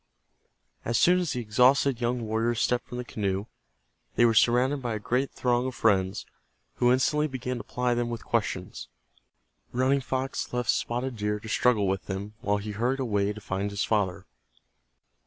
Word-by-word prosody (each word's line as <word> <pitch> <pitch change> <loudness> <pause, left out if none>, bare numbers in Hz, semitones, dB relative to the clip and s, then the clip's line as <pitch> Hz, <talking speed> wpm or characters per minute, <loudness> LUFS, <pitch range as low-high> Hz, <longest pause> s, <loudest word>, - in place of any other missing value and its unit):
As 120 0 0
soon 180 +1 +5
as 175 -6 -1
the 125 - -2
exhausted 125 +3 +3
young 120 +1 0
warriors 110 +1 0
stepped 125 0 0
from 120 - -7
the 125 - -4
canoe 100 -3 -2 0.7
they 120 - +5
were 115 - +4
surrounded 125 +5 +3
by 120 -3 -2
a - - -3
great 125 +6 0
throng 125 0 0
of 130 - -5
friends 95 -3 +1 0.5
who 120 0 +4
instantly 150 +4 +2
began 130 -2 -4
to 115 - -6
ply 125 0 -1
them 120 0 -1
with 115 -2 -6
questions. - - -2 0.8
Running 130 +3 +2
Fox 130 +1 -3
left 125 -1 +1
Spotted 120 +1 -2
Deer 105 0 -1
to 110 - -10
struggle 110 -1 +2
with 95 -1 -2
them, 100 +2 -5
while 105 0 +1
he 105 +1 -5
hurried 120 +6 -1
away 105 -5 0
to 105 - -7
find 100 +1 -2
his 100 0 -2
father. 100 -5 0
120 Hz, 175 wpm, -27 LUFS, 105-125 Hz, 0.8 s, soon